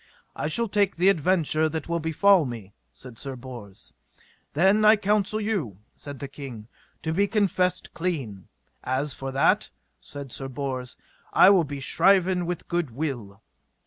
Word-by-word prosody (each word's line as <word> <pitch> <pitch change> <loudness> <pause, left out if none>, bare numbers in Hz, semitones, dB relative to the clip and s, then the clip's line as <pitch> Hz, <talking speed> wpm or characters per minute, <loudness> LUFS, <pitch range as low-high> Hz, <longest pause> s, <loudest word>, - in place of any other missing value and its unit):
I - - -2
shall 230 +9 +2
take 200 -1 +1
the 180 +3 +4
adventure 160 -3 +2
that 160 -1 -5
will 170 0 -1
befall 170 +3 +4
me, 115 -7 -7 0.2
said 125 - -12
Sir 135 -2 -6
Bors. 120 -6 -10 0.6
Then 190 +8 +3
I 215 +1 +7
counsel 210 0 0
you, 195 - -2 0.2
said 145 -1 -8
the 140 - -6
king, 130 -6 -9 0.4
to 160 - -1
be 200 +4 +2
confessed 190 -4 0
clean. 135 - -4 0.4
As 130 +2 -1
for 135 0 -6
that, 135 +1 +2 0.3
said 140 -3 -9
Sir 135 - -4
Bors, 130 -2 -5 0.4
I 195 - +7
will 180 -5 +4
be 145 -1 -6
shriven 180 +4 +2
with 175 -1 -3
a - - -25
good 175 -4 -1
will. 115 -6 -5
155 Hz, 160 wpm, -25 LUFS, 130-185 Hz, 0.6 s, I